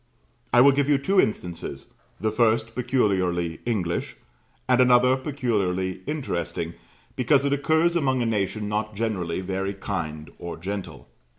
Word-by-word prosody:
I 120 - +6
will 140 +2 +8
give 140 +1 +1
you 145 - +5
two 190 +8 +3
instances, 85 -9 -4 0.3
the 110 +3 0
first 115 0 +2
peculiarly 95 -10 0
English, 90 -8 -1 0.5
and 130 0 +4
another 125 +1 +5
peculiarly 100 -10 -1
interesting 85 - -3 0.4
because 135 +2 +3
it 140 - +2
occurs 160 +4 +2
among 130 -6 +1
a - - -1
nation 105 -1 -1
not 105 0 -2
generally 95 -6 -2
very 95 +1 -3
kind 80 -6 -5
or 85 0 -6
gentle. 100 +3 -6
110 Hz, 135 wpm, -25 LUFS, 95-130 Hz, 0.5 s, will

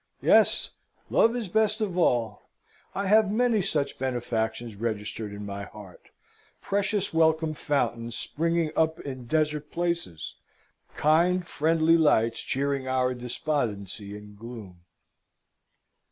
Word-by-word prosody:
Yes, - - +4 0.4
Love 230 +1 +4
is 235 -4 -3
best 215 +3 +2
of 205 -5 -2
all. 120 - 0 0.5
I 200 - -1
have 210 +1 +4
many 230 -1 +2
such 150 -7 -1
benefactions 120 -3 -2
registered 105 -1 -4
in 100 0 -7
my 100 0 -5
heart 105 -4 -13 0.5
precious 200 -1 -1
welcome 160 -1 +3
fountains 120 -6 -1
springing 165 0 0
up 160 0 +1
in 130 -3 -7
desert 150 0 0
places, 170 - -3 0.6
kind, 175 +4 +3
friendly 165 +1 +3
lights 115 -8 +3
cheering 140 0 -1
our 130 -1 +1
despondency 110 - -3
and 105 0 -13
gloom. 105 -5 -10
140 Hz, 115 wpm, -27 LUFS, 115-170 Hz, 0.6 s, Yes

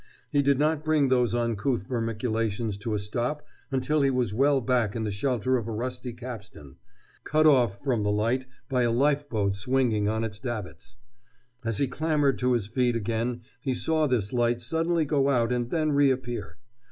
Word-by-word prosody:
He 145 -1 +3
did 140 -1 +3
not 155 +1 +1
bring 155 -3 +2
those 125 -3 +2
uncouth 115 -1 0
vermiculations 115 -2 -1
to 110 +1 -2
a - - +1
stop 120 +8 -3 0.2
until 145 +3 +1
he 140 - +3
was 125 -6 0
well 140 +4 +3
back 120 -4 0
in 115 - -2
the 105 - -2
shelter 130 +4 0
of 115 -2 -4
a - - -3
rusty 125 +2 -4
capstan, 110 - -10 0.5
cut 155 +1 +2
off 120 -9 +4
from 125 -6 +1
the 105 - 0
light 115 +5 0 0.2
by 125 -2 +1
a 120 -1 +2
lifeboat 125 -6 +1
swinging 110 -1 +1
on 110 +1 -1
its 105 -1 -4
davits. 110 - -6 0.7
As 115 -2 -1
he 140 - +1
clambered 145 0 +1
to 125 0 +2
his 115 -5 0
feet 120 +2 0
again 115 +2 -2 0.2
he 130 -2 -1
saw 155 +3 +1
this 115 -6 0
light 120 -1 +2
suddenly 165 +6 0
go 140 -1 +2
out 120 -3 +2
and 120 -1 -1
then 155 0 +1
reappear. 130 -6 0
125 Hz, 180 wpm, -27 LUFS, 110-135 Hz, 0.7 s, off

